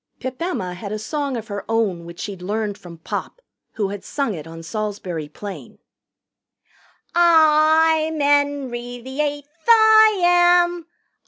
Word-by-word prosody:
Pip 260 +1 -6
Emma 265 - -3
had 200 +3 -7
a 215 - -2
song 280 +4 -3
of 225 -1 -7
her 200 -1 -5
own 205 -7 -1
which 170 0 -10
she'd 195 -3 -6
learned 210 +2 -3
from 175 -4 -12
Pop, 165 - -6 0.3
who 205 -3 -2
had 200 -1 -7
sung 275 -7 -2
it 160 -3 -8
on 165 0 -10
Salisbury 185 -5 -5
Plain: 200 +5 -9 1.4
"I'm 320 -1 +4
'Enry 285 -4 0
the 265 +4 -4
Eighth, 290 -1 -3 0.2
I 440 -2 +6
am. 350 -1 +3
260 Hz, 140 wpm, -21 LUFS, 200-320 Hz, 1.4 s, I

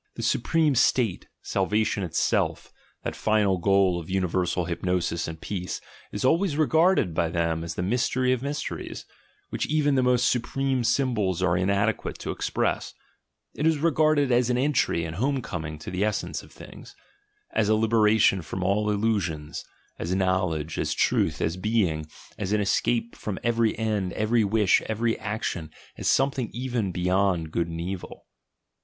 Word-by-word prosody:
The - - -5
supreme 155 +4 +2
state, 125 -5 +2 0.2
sal 95 -1 0
vation 110 -1 +1
itself, 90 -4 -1 0.3
that - - -3
final 105 -4 +2
goal 95 -1 +3
of 85 - -10
universal 90 -1 0
hypnosis 90 -1 -1
and 80 -1 -7
peace, 90 -1 -4 0.3
is 105 - -3
always 165 +2 +2
regarded 160 - +3
by 80 +1 0
them 85 -1 -1
as 85 0 -5
the 90 - -2
mystery 125 +4 +1
of 125 - -2
mysteries, 145 +3 -5 0.5
which - - -2
even 150 -1 +2
the 130 - +3
most 125 -1 +3
supreme 130 +1 0
symbols 105 -9 +1
are 90 -1 +2
inadequate 100 +4 0
to - - -4
express; - - -2 0.6
it 150 - 0
is 160 -1 +3
regarded 155 -3 +2
as 120 0 +3
an 125 - +1
entry 130 - +1
and 80 +1 -6
homecoming 100 - -2
to 80 - -8
the 90 +2 -1
essence 105 0 -2
of - - -17
things, - - -13 0.6
as 105 -1 +1
a 110 - +5
liberation 110 -3 +3
from 90 +4 -5
all 105 +3 +1
illusions, 100 -8 -1 0.4
as 90 +3 -1
"knowledge," 95 -5 0
as - - -1
"truth," - - +1
as 80 +3 -1
"being," 90 -7 0 0.3
as 100 0 -1
an 105 - +2
escape 115 +3 0
from 105 -3 -5
every 115 -2 +1
end, 105 -5 -1
every 110 +1 +2
wish, 105 -1 +3
every 115 +1 0
action, 100 -6 -3 0.3
as - - -4
something 135 -3 +2
even 120 -5 -2
beyond 90 -2 +1
Good 85 0 0
and 85 0 -6
Evil. 90 +2 -6
105 Hz, 160 wpm, -26 LUFS, 90-125 Hz, 0.6 s, a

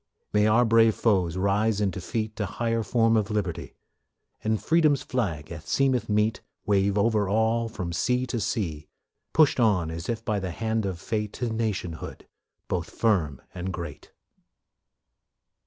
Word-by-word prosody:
May 105 0 +4
our 115 +3 +4
brave 115 -1 +5
foes 95 -6 +1
rise 100 +2 +1
in 100 -2 +1
defeat 110 +4 -4
To 105 - -1
higher 115 +4 -1
form 115 +1 +2
of 105 -1 +1
liberty; 100 -6 -3 0.7
And 110 0 +1
Freedom's 155 -4 +3
flag, 85 -12 -2
as 80 -2 -8
seemeth 130 -5 +1
meet, 105 +1 +1 0.2
Wave 100 0 +2
over 105 -1 +2
all 110 +2 +1
from 90 -6 -5
sea 125 +9 +1
to 120 -1 -3
sea; 80 -8 -2 0.4
Pushed 155 -4 +4
on 95 -8 +2
as 80 +2 -6 0.2
by 105 -2 0
the 95 -1 -3
hand 110 +3 -1
of 90 -3 -4
fate 105 +2 -3
To 120 -3 -3
nationhood, 100 -7 -4 0.4
both 85 -2 -2
firm 85 - 0
and 90 +1 -4
great. 85 -2 -7
105 Hz, 150 wpm, -26 LUFS, 95-115 Hz, 0.7 s, brave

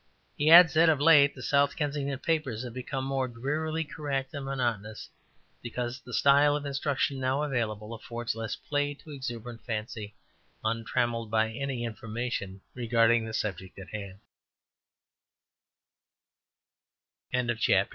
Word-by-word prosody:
He 150 +2 +2
adds 165 -2 +9
that 165 +1 +5
of 155 -3 +3
late 145 -2 +6
the - - -9
South 140 0 +2
Kensington 140 -2 -2
papers 135 -6 -1
have 120 -2 -7
become 130 +1 -4
more 135 -1 0
drearily 150 +7 -2
correct 140 -3 -4
and 140 - -5
monotonous, 115 -6 -3 0.5
because 120 +2 -4
the 125 - -12
style 140 +3 +5
of 150 0 -3
instruction 140 -1 -1
now 130 +3 0
available 115 -6 -2
affords 115 +1 -4
less 115 0 -4
play 145 0 -2
to 150 - -14
exuberant 120 -4 -6
fancy 110 -2 -5 0.5
untrammelled 115 +1 -1
by 110 0 +1
any 130 0 -3
inf 115 +1 -6
135 Hz, 110 wpm, -29 LUFS, 115-145 Hz, 0.5 s, adds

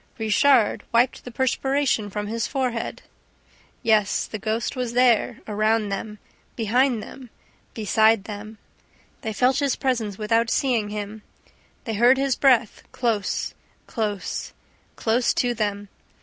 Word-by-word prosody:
Richard 225 +2 +3
wiped 240 +2 +2
the 245 - -7
perspiration 260 -2 0
from 205 +1 -4
his 225 +1 -2
forehead. 255 -4 -3 0.8
Yes, 215 -3 +2
the 215 - -6
ghost 220 +5 -2
was 250 -2 -3
there, 245 -3 +3
around 215 0 +1
them, 210 +2 -5 0.4
behind 235 +1 +1
them, 260 -3 -11 0.5
beside 220 -1 +3
them; 215 +1 -8 0.6
they 220 - -3
felt 250 +5 +2
his 280 -3 +1
presence 230 -7 -1
without 225 +2 +1
seeing 235 -6 +1
him, 210 +1 -6 0.6
they 225 - -4
heard 240 +5 +5
his 270 -1 +1
breath, 250 -5 +3
close, 225 -6 -1 0.3
close, 210 -4 -3 0.4
close 235 +2 +1
to 245 -1 +1
them! 205 -2 -2
225 Hz, 125 wpm, -24 LUFS, 210-250 Hz, 0.8 s, heard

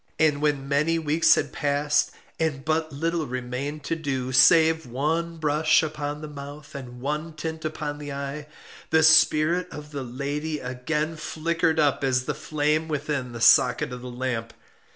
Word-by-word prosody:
And 150 -2 +2
when 145 -2 0
many 150 +4 +1
weeks 160 +1 +4
had - - -2
passed, 145 0 +1 0.3
and 150 -4 -1
but 160 0 0
little 165 +2 -2
remained 130 +4 -4
to 165 - -2
do, 135 -5 -3
save 160 +3 +5
one 160 +7 -1
brush 155 0 +3
upon 150 -1 -4
the 155 - -6
mouth 145 0 -10
and 125 -3 -9
one 150 +4 -3
tint 160 +1 -5
upon 150 -1 -4
the 145 -1 -6
eye, 140 +2 -5 0.4
the 160 0 +4
spirit 160 +2 +5
of 150 0 -9
the 140 -2 -4
lady 145 +5 -3
again 150 +5 -3
flickered 160 +1 -1
up 145 -2 +2
as 130 -2 +1
the - - -2
flame 155 +1 -1
within 145 -4 -3
the 115 -1 -8
socket 125 +1 +5
of 125 - -7
the 125 - -7
lamp. 120 -2 -4
150 Hz, 165 wpm, -25 LUFS, 135-160 Hz, 0.4 s, save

